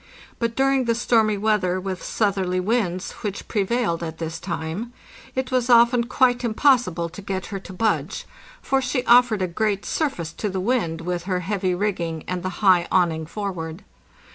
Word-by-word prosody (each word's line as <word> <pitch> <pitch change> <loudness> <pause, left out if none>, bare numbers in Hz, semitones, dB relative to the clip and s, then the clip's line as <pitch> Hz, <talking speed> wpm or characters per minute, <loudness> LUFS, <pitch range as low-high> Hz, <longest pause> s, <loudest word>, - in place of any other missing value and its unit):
But 230 -1 -1
during 270 -1 +2
the 230 -1 +1
stormy 220 -3 +2
weather, 200 -3 +1
with 185 -1 -4
southerly 190 -4 0
winds, 185 -3 -1
which 200 -2 -4
prevailed 205 -4 0
at 160 -1 -5
this 165 0 -5
time, 175 +6 -4 0.4
it 260 0 -2
was 255 -1 +1
often 235 0 +5
quite 250 0 +2
impossible 225 - +2
to 180 +4 -10
get 190 -1 -4
her 195 - -2
to 190 - -11
budge; 215 +3 -1 0.4
for 270 0 +1
she 250 0 -1
offered 235 -5 +5
a - - +1
great 200 +3 -1
surface 175 - -2
to 210 - -3
the 190 0 -3
wind, 185 -6 0
with 175 0 -3
her 185 -2 -1
heavy 185 -1 -1
rigging 175 -5 -2
and 180 -1 -2
the 185 - -2 0.2
high 180 -2 +5
awning 160 -4 +2
forward. 180 -2 -5
195 Hz, 170 wpm, -23 LUFS, 180-235 Hz, 0.4 s, often